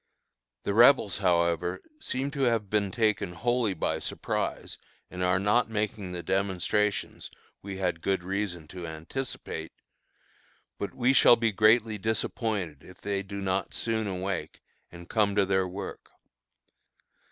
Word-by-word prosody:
The 100 Hz, -, -1 dB
Rebels, 115 Hz, -3 st, +6 dB
however, 90 Hz, -1 st, +1 dB, 0.2 s
seem 135 Hz, -, -2 dB
to 140 Hz, -2 st, -4 dB
have 115 Hz, -5 st, 0 dB
been 105 Hz, -2 st, +2 dB
taken 105 Hz, -4 st, 0 dB
wholly 120 Hz, +1 st, 0 dB
by -, -, -1 dB
surprise -, -, -3 dB, 0.3 s
and 90 Hz, -, -6 dB
are 90 Hz, 0 st, +3 dB
not 105 Hz, +5 st, +2 dB
making 105 Hz, -3 st, -2 dB
the 90 Hz, -1 st, -5 dB
demonstrations 95 Hz, +2 st, 0 dB, 0.3 s
we 100 Hz, -1 st, -6 dB
had 90 Hz, -3 st, -1 dB
good 95 Hz, 0 st, 0 dB
reason 95 Hz, -4 st, -3 dB
to 90 Hz, -3 st, -7 dB
anticipate; 80 Hz, 0 st, -5 dB, 1.1 s
but 100 Hz, -, -4 dB
we 125 Hz, +1 st, +3 dB
shall 120 Hz, -, +8 dB
be 115 Hz, -1 st, +1 dB
greatly 110 Hz, +1 st, +4 dB
disappointed 105 Hz, -, -2 dB
if 90 Hz, -, -14 dB
they 100 Hz, -1 st, -2 dB
do 100 Hz, 0 st, -6 dB
not 95 Hz, 0 st, -1 dB
soon 110 Hz, -2 st, -1 dB
awake, 95 Hz, -1 st, -4 dB, 0.3 s
and 85 Hz, 0 st, -11 dB
come 105 Hz, -2 st, +1 dB
to 100 Hz, -1 st, +4 dB
their 95 Hz, -1 st, +1 dB
work. 95 Hz, +2 st, -7 dB
100 Hz, 140 wpm, -28 LUFS, 90-110 Hz, 1.1 s, shall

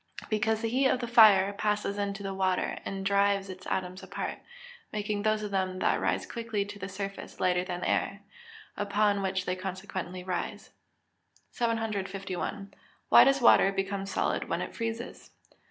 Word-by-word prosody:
_ -, -, -21 dB
Because 220 Hz, +1 st, 0 dB
the 225 Hz, -, +1 dB
heat 260 Hz, +3 st, +3 dB
of 255 Hz, -, +1 dB
the 240 Hz, -, -3 dB
fire 210 Hz, -4 st, +7 dB
passes 210 Hz, -1 st, -1 dB
into 200 Hz, 0 st, -3 dB
the 195 Hz, 0 st, -3 dB
water, 190 Hz, -1 st, 0 dB
and 195 Hz, 0 st, -4 dB
drives 200 Hz, 0 st, +2 dB
its 185 Hz, 0 st, -10 dB
atoms 185 Hz, 0 st, -3 dB
apart, -, -, -5 dB, 0.5 s
making 210 Hz, -1 st, -2 dB
those 215 Hz, 0 st, +1 dB
of 205 Hz, -, -4 dB
them 185 Hz, -1 st, -1 dB
that -, -, +1 dB
rise -, -, 0 dB
quickly 225 Hz, -4 st, -3 dB
to 205 Hz, 0 st, -9 dB
the 190 Hz, 0 st, -5 dB
surface 195 Hz, +1 st, -6 dB
lighter 180 Hz, 0 st, +2 dB
than 180 Hz, -1 st, -5 dB
the -, -, -1 dB
air, 200 Hz, +1 st, -1 dB, 0.5 s
upon 205 Hz, 0 st, +1 dB
which 190 Hz, -1 st, -1 dB
they 180 Hz, -, -1 dB
consequently 185 Hz, -1 st, -5 dB
rise. 180 Hz, -1 st, -4 dB, 0.8 s
751. 200 Hz, -4 st, -3 dB, 0.4 s
_Why -, -, +10 dB
does 275 Hz, 0 st, +3 dB
water 195 Hz, -4 st, +6 dB
become 195 Hz, 0 st, -2 dB
solid 185 Hz, -, -1 dB
when -, -, -1 dB
it -, -, -7 dB
freezes? 230 Hz, +1 st, -5 dB
200 Hz, 170 wpm, -29 LUFS, 190-215 Hz, 0.8 s, Why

